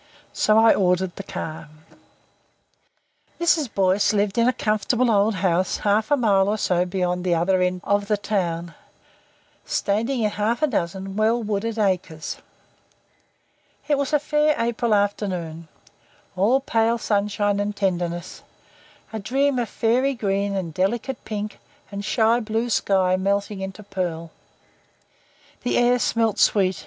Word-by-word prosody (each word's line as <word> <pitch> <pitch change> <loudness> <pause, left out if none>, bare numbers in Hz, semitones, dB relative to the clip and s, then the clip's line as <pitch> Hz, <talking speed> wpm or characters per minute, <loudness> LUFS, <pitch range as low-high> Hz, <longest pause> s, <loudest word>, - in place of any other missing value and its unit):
So 215 0 +3
I 225 0 +6
ordered 180 -1 +1
the - - -6
car. 160 -5 -7 1.7
Mrs. 310 -7 +2
Boyce 195 +2 +2
lived 205 +1 0
in 230 - +4
a - - +5
comfortable 230 +3 +1
old 205 +1 +2
house 185 0 +1
half 210 +3 +1
a 290 - +3
mile 200 -6 +3
or 215 - 0
so 180 -3 +1
beyond 180 -1 -1
the 180 -2 +1
other 185 +3 +2
end 180 0 0
of 205 0 0
the 210 0 +1
town, 175 -5 -2 0.9
standing 230 +5 -1
in 210 - +1
half 220 +6 -1
a - - +7
dozen 195 - -3
well 225 +2 +2
wooded 215 +2 -2
acres. 185 -6 -1 1.5
It 295 - +3
was 280 0 -1
a 300 - +4
fair 300 +1 +1
April 230 -1 +1
afternoon, 180 -5 -2 0.7
all 220 +9 +3
pale 230 -2 +1
sunshine 205 -2 0
and 205 0 -2
tenderness. 175 -3 -2 0.7
A 220 - -3
dream 265 +5 +1
of 235 - -2
fairy 255 +4 +1
green 200 -2 -1
and 175 -4 -3
delicate 225 - -2
pink 210 -1 -5 0.3
and 200 0 -5
shy 225 +2 +2
blue 225 +1 -2
sky 190 -3 +2
melting 200 +1 -1
into 190 +2 -7
pearl. 175 -4 -4 1.3
The 245 - 0
air 245 +1 +3
smelt 225 -3 0
sweet. 190 -3 +3
205 Hz, 140 wpm, -23 LUFS, 185-230 Hz, 1.7 s, a